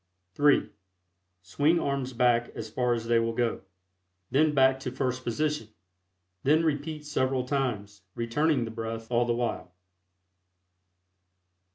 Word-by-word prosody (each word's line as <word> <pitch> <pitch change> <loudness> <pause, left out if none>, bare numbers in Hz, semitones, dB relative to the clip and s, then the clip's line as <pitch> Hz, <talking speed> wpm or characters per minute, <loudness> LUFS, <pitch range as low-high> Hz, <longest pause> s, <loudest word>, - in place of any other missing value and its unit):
(3) 145 +5 +4 0.8
Swing 145 - +2
arms 140 -3 -2
back 120 -1 +2
as 110 -1 -6
far 125 0 +1
as 115 -1 -5
they 115 0 +3
will 115 0 -1
go; 120 -1 0 0.7
then 155 +3 +4
back 130 -2 +4
to 130 -1 -4
first 130 -1 -2
position; 150 0 -1 0.7
then 155 +4 +3
repeat 150 0 -2
several 130 -3 0
times, 115 -7 -2
returning 125 +3 +1
the 115 - -6
breath 115 0 -6
all 120 0 +3
the 120 -1 0
while. 115 -6 -3
125 Hz, 130 wpm, -28 LUFS, 115-145 Hz, 0.8 s, 3